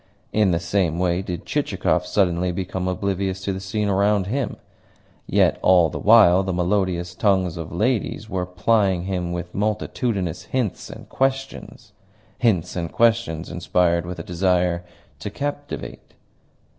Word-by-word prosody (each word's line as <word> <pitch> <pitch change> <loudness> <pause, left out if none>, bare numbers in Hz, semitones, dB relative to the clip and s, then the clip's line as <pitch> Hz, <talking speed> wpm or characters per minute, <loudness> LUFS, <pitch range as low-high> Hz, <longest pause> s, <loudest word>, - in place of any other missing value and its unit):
In 105 -2 +3
the 85 - +2
same 85 -1 0
way 90 0 +1
did 90 -3 -6
Chichikov 90 0 0
suddenly 90 -2 +1
become 90 0 -3
oblivious 95 0 -1
to 95 0 -2
the 95 - -4
scene 105 +2 -2
around 100 0 +2
him. 130 +7 -2 0.7
Yet - - +3
all 90 -3 +5
the - - -5
while 100 -4 +6
the 95 0 -2
melodious 90 -1 0
tongues 95 -2 +1
of 85 -2 -6
ladies 110 +3 -1
were 95 -4 -3
plying 95 0 +1
him 90 -2 -2
with 90 0 -5
multitudinous 105 -3 -2
hints 125 -7 -2
and - - -10
questions 135 0 -3 0.5
hints 100 -9 +1
and 85 -2 -3
questions 115 -8 +1
inspired 85 -1 +1
with 90 0 -5
a 85 - -6
desire 90 0 +1 0.4
to 90 - -5
captivate. 145 +5 -6
95 Hz, 145 wpm, -22 LUFS, 90-105 Hz, 0.7 s, while